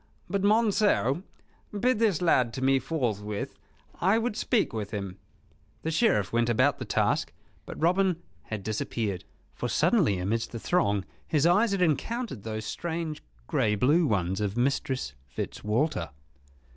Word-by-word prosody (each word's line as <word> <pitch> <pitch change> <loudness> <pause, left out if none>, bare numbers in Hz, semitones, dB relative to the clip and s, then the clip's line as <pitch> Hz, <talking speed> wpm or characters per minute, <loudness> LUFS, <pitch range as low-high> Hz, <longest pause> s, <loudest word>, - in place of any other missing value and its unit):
"But 200 -1 -1
Monceux, 205 - +3 0.6
bid 245 0 +2
this 205 -7 +2
lad 125 -8 +3
to 130 - -4
me 135 0 +4
forthwith. 110 -8 -2 0.5
I 195 +5 +3
would 230 -1 -1
speak 225 - +1
with 105 -3 -3
him." 100 -3 -5 0.6
The 160 - -1
Sheriff 155 - +2
went 120 0 +2
about 115 - +3
the - - -4
task; - - +1 0.4
but - - -7
Robin 180 +1 +2 0.3
had 110 -3 -5
disappeared; 105 -2 -2 0.3
for - - -3
suddenly, 100 - +3
amidst 110 +7 -2
the 115 - -4
throng, 105 - +1 0.2
his 150 -1 +2
eyes 200 +6 +4
had 195 -2 +2
encountered 180 - -1
those 110 0 -5
strange 165 +3 -4 0.2
grey 105 - +1
blue 150 - +3
ones 95 -3 0
of 105 +1 -2
Mistress 130 - 0
Fitzwalter. 105 - -2
135 Hz, 145 wpm, -28 LUFS, -, 0.6 s, me